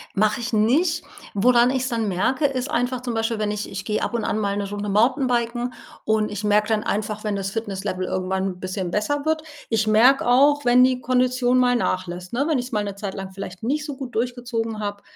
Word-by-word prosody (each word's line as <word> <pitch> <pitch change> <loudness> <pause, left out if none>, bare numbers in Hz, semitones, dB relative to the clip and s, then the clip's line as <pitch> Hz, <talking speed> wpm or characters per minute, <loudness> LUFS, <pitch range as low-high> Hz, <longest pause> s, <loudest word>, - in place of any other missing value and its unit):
Mache 215 +2 +2
ich 235 +1 -4
nicht. 300 +10 +2 0.3
Woran 240 +4 +4
ich's 260 -1 -1
dann 230 -2 -1
merke, 205 - +1
ist 270 0 -1
einfach 245 +1 -1
zum 245 -2 -3
Beispiel, 225 0 -1
wenn 210 -1 0
ich 210 0 -3
ich 195 0 -5
gehe 215 +1 -1
ab - - -2
und 235 -2 -1
an 210 - -1
mal 200 -2 -1
'ne 200 -1 -3
Runde 205 0 -4
Mountainbiken 240 +2 +1 0.3
und 215 -1 +1
ich 205 0 -5
merke 210 0 +3
dann 220 -1 +1
einfach, 210 0 -2
wenn 210 -2 -1
das 195 -1 -2
Fitnesslevel 195 -3 -3
irgendwann 185 +1 -1
'n 185 -2 -3
bisschen 185 -1 -4
besser 285 +9 -1
wird. 315 0 +1 0.3
Ich 220 -1 +1
merke 240 +5 +5
auch 285 +4 +4
wenn 245 +1 +6
die 255 0 +2
Kondition 250 0 +2
mal 250 -1 +4
nachlässt, 180 -5 -2
ne, 265 +4 0
wenn 310 -5 +1
ich 245 - -4
es - - -15
mal 210 -3 0
'ne 200 -1 -4
Zeit 200 -1 -5
lang 195 -1 -6
vielleicht 190 0 -8
nicht 295 +6 -1
so 290 - -5
gut 260 -3 -7
durchgezogen 235 -2 -2
habe, 205 -1 -4
225 Hz, 225 wpm, -23 LUFS, 205-250 Hz, 0.3 s, wenn